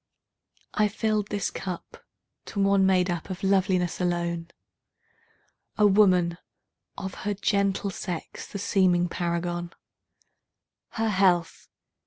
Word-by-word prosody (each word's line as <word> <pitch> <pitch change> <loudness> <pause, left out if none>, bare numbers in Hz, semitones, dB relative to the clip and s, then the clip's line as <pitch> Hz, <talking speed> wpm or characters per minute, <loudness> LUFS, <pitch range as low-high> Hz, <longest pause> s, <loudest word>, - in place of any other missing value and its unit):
I 210 - +3
filled 215 0 -1
this 205 -3 -2
cup 195 - -7 0.4
to 205 - -5
one 195 -1 +4
made 185 -1 +3
up 170 +1 -4
of 185 0 -6
loveliness 190 -2 +1
alone,A 170 +4 -5
woman, 185 -4 +4 0.6
of 190 -1 -5
her 205 +1 -1
gentle 200 0 0
sex 180 -2 -6
the - - -4
seeming 185 -3 +2
paragon—Her 175 +5 -6
health! 185 -4 +2
190 Hz, 100 wpm, -26 LUFS, 175-200 Hz, 0.6 s, one